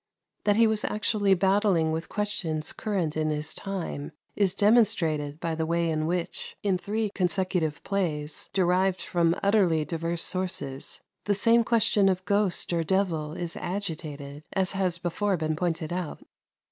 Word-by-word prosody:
That 205 Hz, -1 st, +4 dB
he 230 Hz, +1 st, +5 dB
was 220 Hz, -1 st, +1 dB
actually 210 Hz, -2 st, +2 dB
battling 190 Hz, -3 st, +2 dB
with 160 Hz, +1 st, -3 dB
questions 190 Hz, -8 st, -2 dB
current 185 Hz, -8 st, -2 dB
in 155 Hz, 0 st, 0 dB
his 150 Hz, 0 st, -2 dB
time 185 Hz, -7 st, -5 dB, 0.2 s
is 195 Hz, -3 st, +2 dB
demonstrated 170 Hz, -10 st, +3 dB
by 165 Hz, -1 st, -2 dB
the 160 Hz, 0 st, -1 dB
way 170 Hz, 0 st, +1 dB
in 155 Hz, 0 st, -1 dB
which, 175 Hz, 0 st, -3 dB
in 200 Hz, -2 st, +2 dB
three 210 Hz, +2 st, -2 dB
consecutive 180 Hz, -4 st, 0 dB
plays, 155 Hz, -7 st, -2 dB
derived 185 Hz, 0 st, +2 dB
from 170 Hz, -1 st, +1 dB
utterly 190 Hz, -7 st, +3 dB
diverse 165 Hz, +1 st, -1 dB
sources, 180 Hz, -8 st, -2 dB, 0.2 s
the 205 Hz, -, +2 dB
same 230 Hz, +3 st, +4 dB
question 225 Hz, -4 st, +3 dB
of 185 Hz, 0 st, -1 dB
ghost 200 Hz, -4 st, +1 dB
or 165 Hz, -1 st, +1 dB
devil 165 Hz, -4 st, 0 dB
is 175 Hz, 0 st, -3 dB
agitated, 155 Hz, -6 st, -5 dB
as 190 Hz, -1 st, +2 dB
has 185 Hz, -3 st, 0 dB
before 185 Hz, +3 st, -1 dB
been 155 Hz, -1 st, -1 dB
pointed 165 Hz, -1 st, -2 dB
out. 180 Hz, -3 st, -4 dB
180 Hz, 150 wpm, -27 LUFS, 160-200 Hz, 0.2 s, he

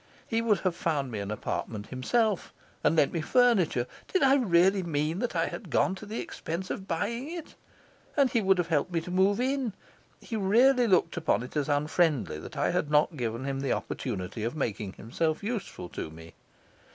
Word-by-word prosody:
He 225 Hz, 0 st, +1 dB
would 220 Hz, -3 st, +2 dB
have 185 Hz, -3 st, 0 dB
found 145 Hz, -7 st, -1 dB
me 110 Hz, -, -3 dB
an 100 Hz, 0 st, -4 dB
apartment 105 Hz, 0 st, -3 dB
himself, 210 Hz, -, 0 dB, 0.3 s
and -, -, +3 dB
lent 145 Hz, -3 st, +3 dB
me 165 Hz, -, -1 dB
furniture 200 Hz, -, +3 dB, 0.2 s
did 375 Hz, -, +1 dB
I 270 Hz, 0 st, +6 dB
really 195 Hz, -6 st, +4 dB
mean 160 Hz, 0 st, -1 dB
that 245 Hz, +1 st, -2 dB
I -, -, +2 dB
had -, -, -6 dB
gone -, -, +2 dB
to 200 Hz, +2 st, -9 dB
the 220 Hz, +2 st, -4 dB
expense 175 Hz, +4 st, -5 dB
of 190 Hz, -, -5 dB
buying 235 Hz, -, -2 dB
it? 340 Hz, -2 st, -7 dB, 0.6 s
and 280 Hz, -2 st, +5 dB
he 230 Hz, -, +2 dB
would 195 Hz, -1 st, +4 dB
have 175 Hz, -1 st, -1 dB
helped 160 Hz, +2 st, +1 dB
me 170 Hz, -, +1 dB
to 180 Hz, -, -7 dB
move 190 Hz, +3 st, +3 dB
in. 260 Hz, -3 st, 0 dB, 0.5 s
He 230 Hz, -, -6 dB
really 240 Hz, +5 st, +4 dB
looked 180 Hz, -3 st, +2 dB
upon 160 Hz, -6 st, +1 dB
it 125 Hz, -, -10 dB
as 150 Hz, -1 st, 0 dB
unfriendly 145 Hz, -, +1 dB
that -, -, -9 dB
I -, -, +1 dB
had 150 Hz, -, 0 dB
not 150 Hz, +2 st, +3 dB
given 120 Hz, -2 st, -3 dB
him 135 Hz, 0 st, -2 dB
the 135 Hz, -2 st, 0 dB
opportunity 105 Hz, -3 st, -4 dB
of 115 Hz, +6 st, -2 dB
making 105 Hz, -8 st, -3 dB
himself 155 Hz, -, -2 dB
useful 210 Hz, -, -4 dB
to -, -, -5 dB
me. 80 Hz, +1 st, -12 dB
170 Hz, 200 wpm, -28 LUFS, 135-220 Hz, 0.6 s, I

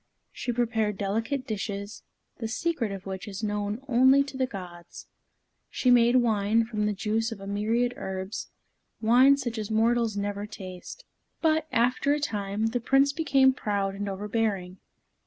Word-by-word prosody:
She 245 Hz, -, -3 dB
prepared 225 Hz, -4 st, 0 dB
delicate 225 Hz, +7 st, -2 dB
dishes, 200 Hz, -2 st, -5 dB, 0.4 s
the 225 Hz, -, -3 dB
secret 245 Hz, -1 st, -1 dB
of 195 Hz, -1 st, -7 dB
which 190 Hz, +2 st, -6 dB
is 200 Hz, +1 st, -6 dB
known 210 Hz, +3 st, -2 dB
only 260 Hz, +2 st, +5 dB
to 275 Hz, -1 st, -10 dB
the 260 Hz, -1 st, 0 dB
gods. 175 Hz, -5 st, -9 dB, 0.6 s
She 250 Hz, -, +1 dB
made 240 Hz, 0 st, +5 dB
wine 225 Hz, -2 st, +3 dB
from 215 Hz, -2 st, -1 dB
the 210 Hz, -, 0 dB
juice 220 Hz, +3 st, -1 dB
of 220 Hz, -, -6 dB
a 195 Hz, -, -9 dB
myriad 225 Hz, +5 st, 0 dB
herbs, 190 Hz, -4 st, -5 dB, 0.5 s
wine 255 Hz, +5 st, +5 dB
such 240 Hz, -4 st, -4 dB
as 215 Hz, -1 st, -4 dB
mortals 225 Hz, 0 st, +2 dB
never 205 Hz, 0 st, -3 dB
taste. 190 Hz, -, -9 dB, 0.3 s
But, 315 Hz, -1 st, +2 dB
after 250 Hz, +4 st, +2 dB
a 295 Hz, -, 0 dB
time, 210 Hz, -4 st, -1 dB
the 245 Hz, -, +1 dB
Prince 270 Hz, +4 st, +3 dB
became 275 Hz, -4 st, +4 dB
proud 200 Hz, -5 st, -1 dB
and 200 Hz, +1 st, -4 dB
overbearing. 195 Hz, -2 st, -2 dB
220 Hz, 155 wpm, -27 LUFS, 200-245 Hz, 0.6 s, only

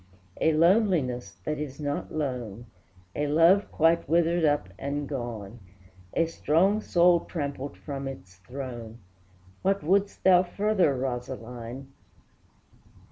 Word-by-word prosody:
A 160 Hz, -, +4 dB
loneliness 155 Hz, -, +2 dB
that 150 Hz, -1 st, -3 dB
is 145 Hz, -2 st, -6 dB
not 145 Hz, -1 st, -3 dB
lone, 125 Hz, -7 st, -4 dB, 0.5 s
A 150 Hz, -, -1 dB
love 165 Hz, +7 st, +4 dB
quite 165 Hz, -2 st, +2 dB
withered 170 Hz, +1 st, +2 dB
up 145 Hz, -10 st, +2 dB
and 140 Hz, +1 st, -3 dB
gone, 120 Hz, -5 st, -6 dB, 0.6 s
A 165 Hz, -, +3 dB
strong 170 Hz, +6 st, +2 dB
soul 175 Hz, -3 st, +4 dB
trampled 140 Hz, -4 st, -5 dB
from 140 Hz, -2 st, -6 dB
its 95 Hz, -8 st, -9 dB
throne, 120 Hz, +2 st, -8 dB, 0.6 s
What 195 Hz, +1 st, +1 dB
wouldst 200 Hz, +5 st, +1 dB
thou 180 Hz, -1 st, +7 dB
further, 190 Hz, -4 st, +1 dB
Rosaline? 125 Hz, 0 st, -6 dB
145 Hz, 115 wpm, -27 LUFS, 125-170 Hz, 0.6 s, thou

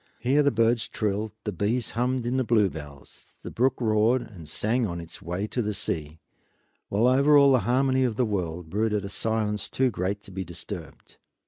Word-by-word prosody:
Here 135 Hz, +4 st, +2 dB
the 140 Hz, -, +4 dB
birds 115 Hz, -1 st, +2 dB
trilled, 105 Hz, 0 st, -2 dB
the 105 Hz, -, -2 dB
bees 115 Hz, +4 st, -1 dB
hummed 125 Hz, +1 st, -1 dB
in 125 Hz, +2 st, 0 dB
the 130 Hz, -, +2 dB
bluebells, 85 Hz, -, -2 dB
the -, -, -6 dB
brook 130 Hz, +2 st, +1 dB
roared 115 Hz, +2 st, +2 dB
and 85 Hz, -8 st, -11 dB
sang 115 Hz, +8 st, 0 dB
on 85 Hz, -2 st, -4 dB
its 85 Hz, -1 st, -9 dB
way 90 Hz, +4 st, -3 dB
to 120 Hz, +3 st, -2 dB
the 105 Hz, -2 st, -2 dB
sea; 75 Hz, -4 st, -3 dB, 0.7 s
while 105 Hz, +4 st, +2 dB
over 140 Hz, +4 st, +5 dB
all 140 Hz, -1 st, +6 dB
the 130 Hz, -, +5 dB
harmony 130 Hz, +1 st, +3 dB
of 120 Hz, -4 st, 0 dB
the 125 Hz, -, +2 dB
world 90 Hz, -5 st, -3 dB
brooded 105 Hz, 0 st, 0 dB
a -, -, -5 dB
silence 110 Hz, -1 st, -1 dB
too 130 Hz, -1 st, +1 dB
great 100 Hz, +1 st, -3 dB
to -, -, -12 dB
be 95 Hz, 0 st, -4 dB
disturbed. 85 Hz, 0 st, -9 dB
110 Hz, 195 wpm, -26 LUFS, 95-125 Hz, 0.7 s, all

